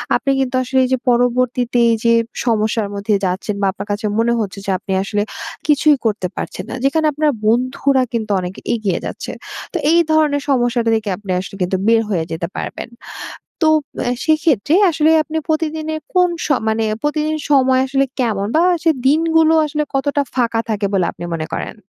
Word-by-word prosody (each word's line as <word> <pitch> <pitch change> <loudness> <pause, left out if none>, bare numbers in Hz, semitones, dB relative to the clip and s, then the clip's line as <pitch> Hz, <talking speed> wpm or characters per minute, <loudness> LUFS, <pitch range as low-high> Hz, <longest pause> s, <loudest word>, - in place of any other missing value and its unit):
আপনি 275 - 0
কিন্তু 265 -1 -1
আসলে 255 +1 0
এইযে 260 +1 +1
পরবর্তীতে 245 0 +1
এইযে 230 +1 +2 0.3
সমস্যার 220 -2 +1
মধ্যে 205 +2 -1
যাচ্ছেন। 190 +3 -2
বা, - - +2
আপনার 200 +1 -8
কাছে 205 +1 -3
মনে 235 +1 +2
হচ্ছে 200 -2 -4
যে 195 - -1
আপনি 195 - -7
আসলে 205 +1 -1 0.4
কিছুই 300 0 +4
করতে 205 -4 0
পারছেন - - -5
না। - - -4
যেখানে 315 +3 +2
আপনার 300 +1 +2 0.2
বন্ধুরা 255 +3 +2
কিন্তু 220 -2 -2
অনেক 180 0 -5 0.2
এগিয়ে 210 -6 -1
যাচ্ছে। - - -5 0.4
তো - - 0
এই 340 - +5
ধরনের 305 -2 +2
সমস্যাটা 240 -3 +1
থেকে 220 -2 -2
আপনি 200 -2 -6
আসলে 190 +1 -7
কিন্তু 180 +1 0
বের 225 0 +5
হয়ে 170 -6 0
যেতে 165 +1 -3
পারবেন। - - -5 0.7
তো 320 - +4 0.4
অ্যা 245 - +1
সেক্ষেত্রে 310 -3 +2 0.2
আসলে 315 0 +3
আপনি 310 +2 -4
প্রতিদিনের 315 0 -2
কোন 360 -1 +4 0.2
স - - -2 0.2
মানে 220 +1 +1 0.2
প্রতিদিন 305 +1 0
সময় 260 -2 +4
আসলে 270 +1 +1 0.2
কেমন? 205 -5 0
বা, 325 - +4 0.2
সে 330 - +4 0.2
দিনগুলো 320 +2 +3
আসলে 300 0 -1
কতটা 285 +1 +1
ফাঁকা 235 -3 +1
থাকে 210 -2 -1
বলে 190 -3 +2
আপনি 175 - -10
মনে 160 -1 -3
করেন? - - -4
245 Hz, 175 wpm, -18 LUFS, 215-300 Hz, 0.7 s, এই